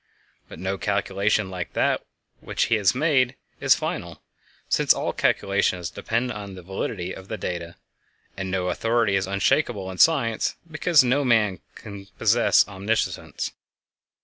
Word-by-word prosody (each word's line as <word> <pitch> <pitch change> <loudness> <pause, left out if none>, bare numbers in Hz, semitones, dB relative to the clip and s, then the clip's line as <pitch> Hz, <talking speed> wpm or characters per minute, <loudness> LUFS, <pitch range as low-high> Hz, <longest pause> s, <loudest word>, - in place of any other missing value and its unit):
But - - -10
no 95 +2 -3
calculation 100 0 0
like 90 -2 -5
that - - +1 0.4
which - - -1
he 110 -2 +1
made 135 -3 +2 0.2
is - - +5
final, - - -5 0.4
since - - +3
all - - -2
calculations 95 -3 0
depend 120 +2 -2
upon 100 -3 -7
the 90 - -10
validity 95 0 -4
of 95 - -11
the 110 - -4
data; 85 -3 -5 0.6
and 95 -1 -4
no 90 -1 -1
authority 115 +1 +1
is 95 -1 0
unshakable 100 0 0
in 90 - -9
science, 125 -9 +3 0.2
because 155 -1 +4
no 130 +3 +2
man 110 -7 +2 0.2
can 100 -2 -10
possess - - +4
omniscience. 100 +3 -2
100 Hz, 140 wpm, -24 LUFS, 95-115 Hz, 0.6 s, is